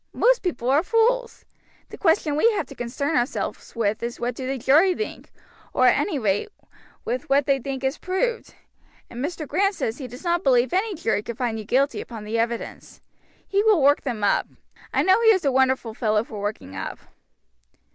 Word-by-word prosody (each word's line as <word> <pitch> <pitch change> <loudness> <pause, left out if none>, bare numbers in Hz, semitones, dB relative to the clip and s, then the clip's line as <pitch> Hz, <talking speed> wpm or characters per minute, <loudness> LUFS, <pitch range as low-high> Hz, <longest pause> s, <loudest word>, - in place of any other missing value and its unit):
Most - - +3
people 310 -10 -3
are 285 +3 +4
fools. 470 +5 +1 0.4
The - - -8
question 325 -4 +2
we 455 +10 +4
have 410 - -1
to - - -12
concern 280 +5 -3
ourselves 245 0 -2
with 215 -2 0
is 235 0 -4
what 245 +1 -2
do 255 +2 -6
the 270 +1 -2
jury 310 +9 +4
think, 435 - -6 0.4
or - - +3
at - - +6
any 345 -8 -1
rate 210 - 0 0.6
with 250 +2 -3
what 275 0 +3
they 275 -1 +2
think 270 +1 -5
is 265 +3 -1
proved, 455 +6 -2 0.6
and 240 +2 -5
Mr. 310 0 -4
Grant 390 +7 +1
says 225 -4 -3
he 260 - -5
does 250 +5 -11
not 345 0 0
believe 250 -2 +3
any 395 +2 0
jury 225 -10 0
could 230 +1 -7
find 235 -3 -2
you 215 - -7
guilty 275 +6 +1
upon 225 -3 -9
the 220 +2 -2
evidence. 235 0 -4 0.5
He 400 +1 +2
will 430 -4 +4
work 285 +1 +5
them 235 -6 -4
up. 205 - +2 0.4
I - - +2
know 380 +4 +4
he 460 - +3
is 375 -7 +3
a 275 - +3
wonderful 260 -3 +1
fellow 215 -2 +1
for 215 -3 -8
working 205 - -5
up." - - -5
270 Hz, 200 wpm, -24 LUFS, 235-360 Hz, 0.6 s, at